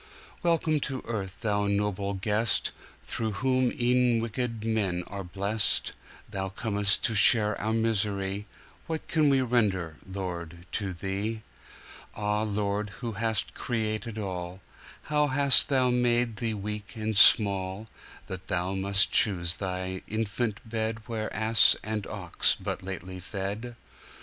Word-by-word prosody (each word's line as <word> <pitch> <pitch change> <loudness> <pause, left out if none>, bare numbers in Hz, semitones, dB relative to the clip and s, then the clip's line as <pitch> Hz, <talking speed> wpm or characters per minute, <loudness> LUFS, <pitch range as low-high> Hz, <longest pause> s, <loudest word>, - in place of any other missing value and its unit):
Welcome 165 -2 +1
to 135 -2 -5
earth, 100 -5 -5
Thou 105 -2 0
noble 100 -1 -1
guest, 105 +4 0 0.3
Through 110 -2 -4
whom 130 +4 +1
e'en 125 -1 +2
wicked 115 -1 -3
men 100 -6 -1
are 100 -1 -7
blest! 100 +4 0 0.3
Thou 95 0 -4
com'st 100 0 +3
to 115 - +3
share 105 0 +6
our 110 - -1
misery, 105 -3 -1 0.4
What 160 -1 -4
can 155 -2 +2
we 135 -1 +3
render, 100 -10 0
Lord, 85 -3 -6
to 100 -3 -3
Thee! 100 +5 -4 0.7
Ah, 105 0 -1
Lord, 105 -1 -2
who 120 -2 -3
hast 110 0 -1
created 110 -2 -3
all, 90 -2 -5 0.4
How 150 -1 +1
hast 140 0 +5
Thou 130 -3 +2
made 120 -2 +1
Thee 115 -3 -1
weak 105 +2 -5
and 110 -1 -3
small, 100 0 +4 0.4
That 95 0 -8
Thou 90 +2 -2
must 100 +1 +4
choose 90 -5 +4
Thy 95 -1 -4
infant 110 +1 -3
bedWhere 110 0 -3
ass 110 -1 +4
and 105 -1 -4
ox 95 -5 0
but - - -4
lately 95 0 -7
fed! 100 +6 -5
105 Hz, 130 wpm, -27 LUFS, 95-115 Hz, 0.7 s, share